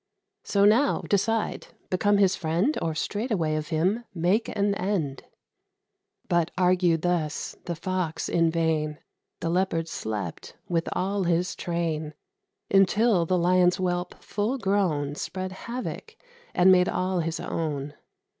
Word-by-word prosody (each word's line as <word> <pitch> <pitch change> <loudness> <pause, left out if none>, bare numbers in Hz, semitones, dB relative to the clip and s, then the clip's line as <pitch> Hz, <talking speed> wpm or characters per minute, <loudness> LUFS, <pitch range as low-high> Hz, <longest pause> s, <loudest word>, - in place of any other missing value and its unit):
So, 200 -1 +2
now, 235 +8 +4
decide: 220 +2 0 0.2
become 205 +2 +3
his 195 -2 +4
friend, 175 - 0
Or 160 -1 -1
straightway 205 -3 -1
of 155 0 -2
him 185 +8 0
make 180 +7 +1
an 200 0 +1
end." 180 -9 -2 1.0
But 170 -1 +2
argued 180 -3 +3
thus 170 -4 -1
the 170 - -3
Fox 180 -1 -2
in 165 -1 +2
vain: 160 -2 0 0.4
The 165 - -1
Leopard 175 -2 0
slept, 105 - -5
with 170 -1 0
all 195 +1 -1
his 175 +2 +1
train, 160 -3 -2 0.6
Until 195 -1 +4
the 185 - +2
Lion's 180 +1 +4
whelp, 180 -1 -2
full 215 +6 -1
grown, 185 - 0
Spread 185 +5 -4
havoc, 250 - -6 0.4
and 185 +1 +6
made 180 -1 +5
all 185 0 0
his 165 0 -2
own. 145 -3 -3
180 Hz, 130 wpm, -26 LUFS, 165-195 Hz, 1.0 s, and